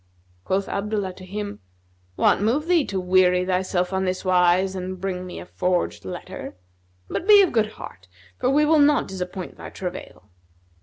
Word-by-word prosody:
Quoth 195 +1 0
Abdullah 200 -2 -2
to 185 - -13
him, 205 +1 -5 0.6
"What - - +3
moved 260 +9 +1
thee 345 -5 +3
to 195 - -3
weary 180 0 +3
thyself 185 0 0
on 190 0 0
this 185 +1 -2
wise 185 +1 +3
and 185 0 -5
bring 185 -1 -4
me 180 - -7
a - - -9
forged 180 0 -1
letter? - - -7 0.5
But 350 - -4
be 410 -2 +8
of 370 - +1
good 215 -2 +1
heart; 90 0 -11 0.3
for 255 - +1
we 295 +3 +4
will 310 0 +4
not 290 0 +4
disappoint 185 -1 -6
thy - - -8
travail." 180 - -8
190 Hz, 170 wpm, -23 LUFS, 180-215 Hz, 0.6 s, be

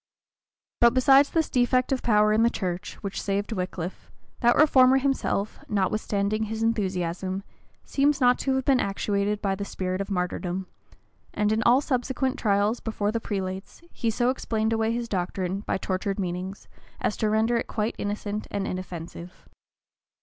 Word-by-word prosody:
But 235 +1 +5
besides 270 +2 +6
this 325 -2 +1
defect 255 0 +2
of 265 - +1
power 210 -2 +4
in 220 - +3
the 235 - +5
church, 185 -3 -4
which 200 -1 -3
saved 200 +2 -2
Wickliffe, 180 -3 -4 0.3
that 240 -1 +4
reformer 265 -4 +6
himself, 270 -6 -1
notwithstanding 210 +1 0
his 220 +1 -3
enthusiasm, 190 -3 -1 0.4
seems 280 0 +1
not 250 -1 +4
to 270 -1 0
have 265 -1 -1
been 270 -2 +4
actuated 200 +1 -1
by 195 -1 +1
the 195 +1 -4
spirit 185 -1 -3
of 195 - -5
martyrdom; 180 0 -2 0.7
and 210 0 +1
in 220 +1 +1
all 245 +4 +5
subsequent 265 0 -1
trials 205 +2 +2
before 215 -2 -2
the 230 0 -2
prelates, 190 - -5
he 230 - -1
so 240 +3 +2
explained 220 -3 -1
away 225 0 +1
his 235 0 -2
doctrine 185 -1 -2
by 205 - -2
tortured 195 +1 -2
meanings, 185 +1 -4 0.3
as - - 0
to 215 - +1
render 220 +2 +2
it 235 - -1
quite 215 +1 -1
innocent 205 +1 -3
and 195 -1 -2
inoffensive. 175 -1 -7
210 Hz, 160 wpm, -26 LUFS, 195-240 Hz, 0.7 s, besides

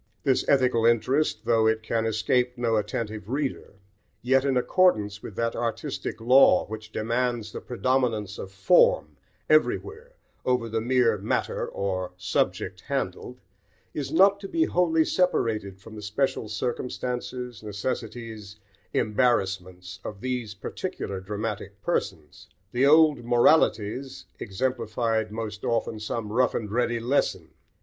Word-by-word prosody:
This 135 -3 +2
ethical 125 -4 +3
interest, 120 +6 +2
though 115 -1 +3
it 110 0 +1
can 115 0 0
escape 125 +3 +1
no 115 -2 +1
attentive 105 -1 -3
reader, 135 -5 -3 0.5
yet, 135 +2 +3
in 135 -2 +2
accordance 110 - +2
with 100 - -9
that 115 0 -1
artistic 115 -1 -3
law 125 +4 +5
which 110 0 -8
demands 115 -1 -1
the - - -7
predominance 120 -5 -1
of 95 - -7
form 95 -5 +3 0.3
everywhere 435 - +1 0.3
over 125 -2 +1
the 110 0 -1
mere 120 -3 +2
matter 100 - -1
or 95 -2 -3
subject 90 - -1
handled, - - -3 0.5
is 145 -3 -4
not 195 +4 +5
to 200 - -7
be 325 +10 +1
wholly 165 - +2
separated 110 - 0
from 110 +2 -13
the 105 - -8
special 110 +2 -1
circumstances, 125 +1 -4
necessities, 110 0 -5 0.4
embarrassments, 95 -5 0
of 105 - -7
these 125 -4 -3
particular 95 0 -5
dramatic 105 +1 -5
persons. - - -3 0.2
The 130 +3 +3
old 150 -3 +5
"moralities" 120 0 +2
exemplified 115 0 -1
most 110 -1 -5
often 115 -1 -1
some 105 0 -4
rough 125 +1 +2
and 105 -3 -3
ready 120 0 0
lesson. 125 +5 0
115 Hz, 125 wpm, -26 LUFS, 105-130 Hz, 0.5 s, law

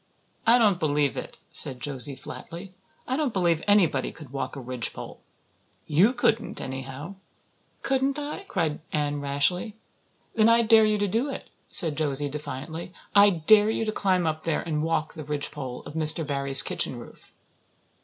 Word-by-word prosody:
"I 235 +2 +6
don't 210 -6 +2
believe 145 -3 0
it," - - -8
said 130 -2 +5
Josie 140 -1 -3
flatly. 175 +7 -10 0.3
"I 255 - -1
don't 285 -5 -1
believe 170 -4 +1
anybody 180 -10 +2
could 150 -5 -13
walk 135 -1 -5
a - - -7
ridgepole. 125 -2 -6 0.7
You 180 - +3
couldn't, 235 -2 -1
anyhow." 135 +7 -7 0.7
"Couldn't 270 +1 0
I?" 295 +3 -5
cried 155 -2 -2
Anne 145 -1 -2
rashly. 145 +10 0 0.6
"Then 220 0 +3
I 230 0 +4
dare 220 -1 +5
you 215 0 +1
to 205 0 -1
do 230 +9 -1
it," 270 - -8 0.2
said 160 -5 +8
Josie 145 -2 0
defiantly. 150 +4 -7 0.2
"I 205 0 +7
dare 205 +5 +4
you 225 0 -1
to 215 - -1
climb 185 -4 0
up 155 -1 -3
there 165 -2 -1
and 155 -2 -2
walk 160 -1 -2
the 155 - -8
ridgepole 145 -3 -4
of - - -9
Mr. 160 0 0
Barry's 140 -1 +3
kitchen - - -2
roof." - - -14
160 Hz, 165 wpm, -25 LUFS, 145-210 Hz, 0.7 s, said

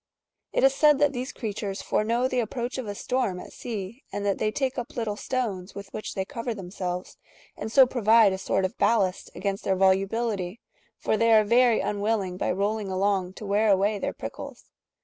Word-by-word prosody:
^® - - -64 0.5
It - - +1
is 270 0 +6
said 300 +1 +5
^° - - -6
that 290 -1 +3
these 255 +1 -4
creatures 205 -3 -4
foreknow 235 +4 +1
the 255 -1 -1
approach 240 +2 -3
of 250 - -5
a 205 - -4
storm 210 -6 -1
at - - -11
sea, 225 +2 -6
and 205 0 -3
that 200 -1 0
they 215 - +1
take 260 +3 -1
up 240 - -7
little 225 -3 -2
stones 205 -7 -3
with 200 -1 -9
which 215 - -5
they 190 -1 -1
cover^^ 230 +2 -4
themselves, 180 -2 -5 0.4
and 220 - -6
so 265 +2 +8
provide 225 -4 +4
a 190 - -4
sort 190 0 0
of 185 - -5
ballast 195 -6 +1
against 195 +2 -3
their 190 - +1
volu 190 +1 +3
bility, 215 -4 -2 0.4
for 220 - 0
they 230 +1 +3
are 215 -1 +7
very 235 +1 +4
unwilling 205 -2 -1
by - - -1
rolling 205 +3 -1
along 190 -1 0
to 210 - -9
wear 205 +2 +2
away 200 +1 +2
their - - -2
prickles. - - -9
210 Hz, 210 wpm, -26 LUFS, 195-235 Hz, 0.5 s, so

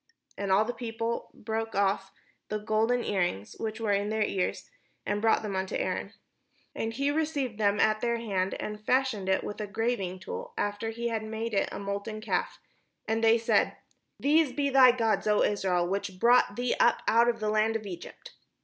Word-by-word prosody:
'And 200 -1 -3
all 200 +3 +4
the 245 - -3
people 230 -1 -4
brake 225 0 -4
off 195 -1 +1 0.4
the 215 - -1
golden 220 +3 +1
earrings 175 - -1
which 220 0 -4
were 220 -2 0
in 200 +1 +1
their 220 0 +1
ears, 190 -3 -2 0.4
and 205 0 -1
brought 225 0 +3
them 205 -2 -3
unto 190 0 -2
Aaron. 185 +2 -2 0.6
And 225 - -2
he 275 +4 0
received 290 -7 -1
them 205 -1 +2
at 215 0 +3
their 235 -1 +1
hand, 195 -5 -1
and 210 0 -6
fashioned 250 -6 +1
it 190 - +2
with 205 - -5
a 210 - -3
graving 200 -3 -2
tool, 190 - -7
after 205 +2 -2
he 235 +1 -3
had 225 -1 -2
made 220 +1 -4
it 195 - +1
a - - -5
molten 200 +2 -4
calf; 215 - -2 0.5
and 225 +1 0
they 225 +1 +6
said: 230 - +1 0.2
" - - -50
These 300 -1 +3
be 280 +1 0
thy 260 -2 +8
gods, 225 -3 0
O 210 -1 +4
Israel, 185 -4 +1
which 195 0 -3
brought 240 -2 +4
thee 245 +1 0
up 235 - +3
out 235 +1 +5
of 230 -1 -1
the 215 -1 0
land 215 +1 +2
of 220 -1 -3
Egypt." 180 -4 -9
220 Hz, 195 wpm, -29 LUFS, 200-235 Hz, 0.6 s, thy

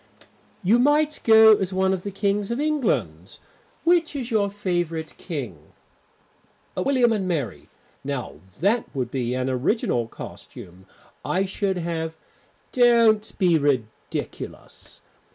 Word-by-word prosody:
"You 215 +6 +4
might 295 +3 +2
go 220 -1 +8
as 190 -1 -2
one 190 0 +1
of 185 - -3
the 200 - -5
Kings 200 +1 -1
of 235 +2 -2
England. 300 -3 -1 0.5
Which 335 -3 +2
is 255 -3 -4
your 205 -3 +2
favourite 175 -5 -3
King?" 120 - -7 1.0
"William 245 +3 +2
and 195 -4 -2
Mary. 145 - -3 0.3
Now 140 -2 -5 0.2
that 215 +6 +2
would 125 -3 -2
be 125 -2 -2
an 130 0 -1
original 130 - 0
costume. 95 -4 -11 0.4
I 190 +2 0
should 195 0 -2
have 165 -2 -3 0.3
" - - -38
"Don't 230 -4 +4
be 175 -5 +3
ridiculous. 130 -7 -4
190 Hz, 125 wpm, -24 LUFS, 145-225 Hz, 1.0 s, go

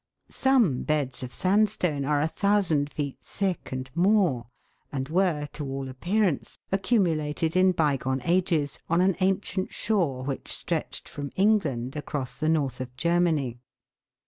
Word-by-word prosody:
Some 240 - +3
beds 145 -5 -1
of 125 -1 -6
sandstone 185 -7 +1
are 145 0 +2
a 155 - +2
thousand 185 -6 +1
feet 140 -3 -4
thick 190 -4 -3
and 130 0 -4
more, 175 - +2 0.4
and 135 -2 -3
were, 165 -2 +1
to 150 - -5
all 135 -1 -4
appearance, 175 +5 -1
accumulated 165 -6 +1
in 185 0 +5
bygone 140 -6 0
ages 170 -5 +1
on 170 +1 +3
an 190 -1 +3
ancient 190 0 0
shore 165 -12 0
which 135 0 -4
stretched - - -2
from 140 -1 -6
England 155 - +1
across 145 -3 -4
the 155 - +1
North 140 -6 0
of 125 -1 -7
Germany. 165 -8 +1
155 Hz, 140 wpm, -26 LUFS, 135-185 Hz, 0.4 s, in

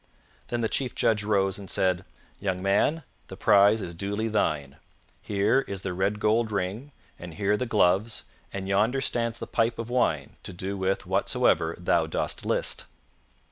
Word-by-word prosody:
Then 120 -1 -2
the 110 - +1
chief 125 +2 -1
judge 105 -2 +2
rose 100 -2 +1
and 100 -2 -9
said, 95 -1 0 0.3
"Young 95 -2 -1
man, 105 +11 +2 0.2
the - - -9
prize 100 +1 +5
is 85 - -6
duly 100 +5 -2
thine. 75 -10 -1 0.4
Here 105 +6 +2
is 95 -1 -6
the 95 - -2
red 100 +3 0
gold 110 +1 +2
ring, 105 +8 -3 0.3
and 85 -2 -9
here 100 0 +1
the 125 +3 -2
gloves, 105 0 +2 0.3
and 95 -1 -5
yonder 105 +7 +2
stands 115 -3 -1
the - - -5
pipe 115 0 0
of 115 +1 -5
wine 80 - 0
to - - -8
do 95 +3 -4
with 95 0 -1
whatsoever 80 +1 +2
thou 90 - +1
dost - - -2
list." - - 0
100 Hz, 170 wpm, -27 LUFS, 95-115 Hz, 0.4 s, prize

